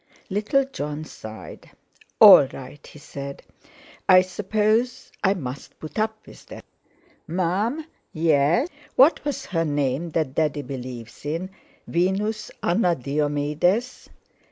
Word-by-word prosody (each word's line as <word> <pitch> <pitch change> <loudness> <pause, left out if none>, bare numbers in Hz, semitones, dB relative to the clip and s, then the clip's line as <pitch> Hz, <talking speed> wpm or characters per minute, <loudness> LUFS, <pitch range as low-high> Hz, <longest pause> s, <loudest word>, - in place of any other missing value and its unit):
Little 215 +7 +1
Jon 150 - -5
sighed, 110 -6 -11 0.5
"All 135 - +10
right!" 135 +3 -11
he - - -14
said: 140 -1 -8 0.7
"I 185 -1 +9
suppose 215 +7 0
I 195 0 +3
must 135 -6 -7
put 155 +7 -6
up 220 0 -2
with - - -15
that. - - -11 0.6
Mum?" 190 - -1 0.3
"Yes?" 160 - +2 0.3
"What 275 +6 +5
was 285 -2 -3
her 165 -4 -1
name 145 +1 -1
that 155 -5 -1
Daddy 150 -1 0
believes 125 -4 -8
in? 165 +6 -3 0.4
Venus 200 +5 -1
Anna 175 -1 +2
Diomedes?" 150 - -1
170 Hz, 115 wpm, -24 LUFS, 145-215 Hz, 0.7 s, All